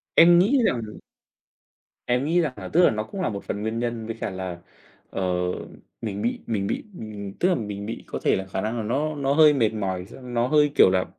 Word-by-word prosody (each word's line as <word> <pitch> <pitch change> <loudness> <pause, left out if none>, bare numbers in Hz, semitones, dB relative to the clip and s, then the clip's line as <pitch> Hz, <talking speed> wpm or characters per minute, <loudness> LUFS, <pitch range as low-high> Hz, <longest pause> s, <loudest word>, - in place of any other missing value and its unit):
Em 170 +1 +8
nghĩ 215 +10 +4
rằng 120 - 0 1.3
Em 125 +2 +1
nghĩ 170 +3 +3
rằng 150 -6 -1
nà - - -7
tức 175 - +6
là - - +7
nó 110 -1 -2
cũng 190 - -6
là 180 - +1
một 100 -2 -5
phần 105 - -4
nguyên 110 +1 -2
nhân, 120 -2 -3
với 115 - -4
cả - - -1
là, 95 -2 -5 0.5
ờ, - - -4 0.8
mình 105 -3 -4
bị 120 +3 -1
mình 100 -4 -1
bị - - -2
mình 105 - -7
tức 180 - +3
là 180 - +3
mình 105 -4 -4
bị 115 - -6
có - - -4
thể - - +3
là 95 - -3
khả 95 0 -3
năng 110 +3 -2
là 115 - -2
nó 145 +8 -1
nó 140 -1 0
hơi 155 0 +7
mệt 115 -6 +2
mỏi, 95 -3 -3
gi - - -13
nó 120 -1 0
hơi 150 0 +4
kiểu - - +7
là 95 0 +1
115 Hz, 240 wpm, -24 LUFS, 100-145 Hz, 1.3 s, Em